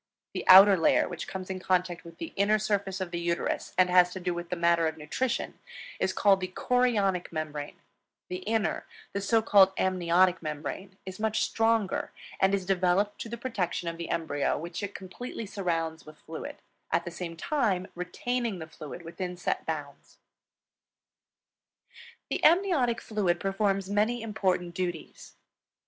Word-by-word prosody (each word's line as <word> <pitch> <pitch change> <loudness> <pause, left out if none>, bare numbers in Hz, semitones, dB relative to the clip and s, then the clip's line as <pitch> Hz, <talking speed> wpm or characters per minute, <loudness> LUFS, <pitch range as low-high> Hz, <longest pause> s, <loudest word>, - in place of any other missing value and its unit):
The - - -3
outer 195 +1 +10
layer, - - +4
which 175 -2 -6
comes 190 0 -5
in 185 - -4
contact 180 -2 0
with 170 -1 -12
the 330 - -7
inner 205 +2 +3
surface 200 -2 -1
of 180 -2 -3
the 170 - -2
uterus 170 0 -2
and 185 -1 +6
has 180 -1 +6
to 190 - -5
do 180 -1 -1
with 175 0 -6
the 180 - -1
matter 170 -1 +3
of 160 0 -4
nutrition, 230 +12 -2 0.4
is - - +1
called 195 -2 +4
the 185 - -1
Chorionic 205 -3 +1
Membrane; 150 -2 -4 0.5
the 180 - -4
inner, 215 +3 -1 0.3
the 200 - -2
so 225 +3 +2
called 195 -3 +6
Amniotic 180 -1 +2
Membrane, 165 +5 -5
is 190 +1 -8
much 220 0 0
the - - 0
stronger 225 -3 +1 0.3
and 195 +1 +4
is 190 -2 -3
devoted 190 +1 +2
to 230 - -6
the 235 - -5
protection 195 -8 -2
of 165 - -6
the 170 - -5
embryo, 145 -4 0
which 170 +5 -5
it 200 -1 -5
completely 220 +5 -7
surrounds 165 -5 -2
with 155 0 -14
fluid, 160 0 -8 0.3
at 165 - +1
the 175 - -5
same 170 -1 -6
time 210 - 0
retaining 225 +5 -2
the 160 - -6
fluid 155 +1 -9
within 180 +2 -5
set 175 - -2
bounds. - - -6 2.1
The - - -2
amniotic 320 -9 +4
fluid 190 -6 0
performs 195 -1 0
many 215 +4 +1
important 185 -5 -1
duties. 175 -2 -5
185 Hz, 165 wpm, -28 LUFS, 170-205 Hz, 2.1 s, outer